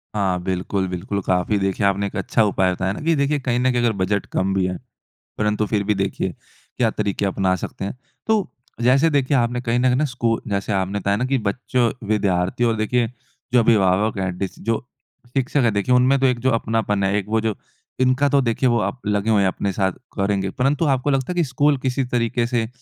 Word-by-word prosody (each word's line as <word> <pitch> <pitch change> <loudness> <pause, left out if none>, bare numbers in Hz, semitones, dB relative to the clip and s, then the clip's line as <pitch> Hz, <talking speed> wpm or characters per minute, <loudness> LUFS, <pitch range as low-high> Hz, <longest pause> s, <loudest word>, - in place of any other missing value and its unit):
हाँ, 95 -3 0
बिल्कुल, 95 +1 -1
बिल्कुल। 95 +3 -3
काफ़ी 90 +3 +1
देखिए 95 +1 0
आपने 100 +1 0
एक - - -9
अच्छा 115 - +1
उपाय 95 -3 +2
बताया 95 +1 -1
ना - - -7
कि 165 0 +3
देखिए 140 +1 +1
कहीं 125 -2 -1
न 130 +1 +2
कहीं 120 -1 0
अगर 120 -1 +3
बजट 100 +2 0
कम 95 +1 0
भी 95 -1 +1
है। 90 0 -2 0.6
परंतु 105 0 +1
फिर 105 -2 0
भी 105 +1 +1
देखिए, 95 -1 -1 0.5
क्या - - +3
तरीक़े 100 0 -1
अपना 95 -1 +1
सकते 95 - -6
हैं? 100 - -5 0.3
तो 220 -3 +1 0.3
जैसे 135 +7 +4
देखिए 140 -2 +2
आपने 120 0 0
कहीं 120 -1 0
न - - 0
कहीं 125 -1 +3
ना 145 +4 +2
स्कू 120 -4 -1
जैसे 100 0 -1
आपने 95 +1 -1
बताया 100 0 0
ना 125 - 0
कि 135 +1 +1
बच्चों, 120 +2 0 0.2
विद्यार्थी 100 0 0
और 115 -1 +2
देखिए 115 +2 +1 0.5
जो 125 - +6
अभिभावक 105 -2 +3
है, 95 -1 -1
डिस 95 0 -5
जो 115 +3 -2 0.4
शिक्षक 135 +3 0
है 115 - +3
देखिए 100 +5 +1
उनमें 130 +2 +4
तो 135 - +2
एक 125 -2 0
जो 130 +2 +1
अपनापन 110 -3 0
है 95 +1 +1
एक 100 - -2
वो 110 0 +1
जो 110 -2 -1 0.5
इनका 130 +3 +3
तो 140 0 +3
देखिए 125 +1 +1
वो 120 - +2
अप 100 +5 -2
लगे 105 +1 0
हुए 105 -2 +4
हैं 95 - +3
अपने 100 +1 -1
साथ, 95 0 +1 0.3
करेंगे। 100 -1 0
परंतु 140 - +1
आपको 135 -1 +1
लगता 135 +2 0
है - - -4
कि 175 - +2
स्कूल 145 +1 +2
किसी 130 +1 -1
तरीक़े 120 -1 0
से 120 -2 0
110 Hz, 225 wpm, -21 LUFS, 100-125 Hz, 0.6 s, जो